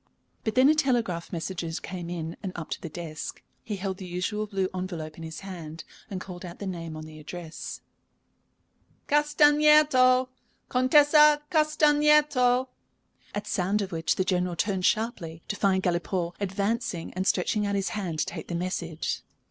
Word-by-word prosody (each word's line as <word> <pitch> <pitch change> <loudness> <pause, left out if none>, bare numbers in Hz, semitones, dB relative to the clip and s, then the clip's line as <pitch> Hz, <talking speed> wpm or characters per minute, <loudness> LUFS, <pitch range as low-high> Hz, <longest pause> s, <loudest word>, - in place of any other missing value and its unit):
But 220 -1 -2
then 255 +1 +6
a 305 - +6
telegraph 235 - 0
messenger 170 0 -4
came 175 -2 -6
in 165 -1 -4
and 190 - -4
up 165 -2 -7
to - - -3
the 165 - -6
desk. 155 -1 -7 0.2
He 215 -3 -4
held 190 -1 -3
the 190 -2 -8
usual 200 +4 -2
blue 195 -2 -1
envelope 175 -4 -5
in - - -11
his 160 0 -7
hand, 170 -5 -8 0.3
and 190 - -4
called 180 -1 -9
out 175 -1 -8
the 200 - -6
name 165 -4 -5
on 155 - -7
the 155 0 -11
address: 160 +1 -7 1.3
"Castagneto. 295 -3 +5 0.4
Contessa 295 +3 +5
Castagneto." 300 -5 +4 0.7
At 205 0 -3
sound 200 +2 0
of 195 - -6
which 165 -1 0
the 185 - +1
General 180 -1 0
turned 190 0 0
sharply, 175 -8 -2
to 205 - -2
find 190 -2 +2
Galipaud 175 0 -1
advancing 200 -1 -2
and 185 +2 -2
stretching 205 +3 +1
out 200 - -1
his 195 -1 0
hand 185 -7 -3
to - - +1
take - - -7
the 170 - -3
message. 170 -2 -3
190 Hz, 165 wpm, -27 LUFS, 170-250 Hz, 1.3 s, then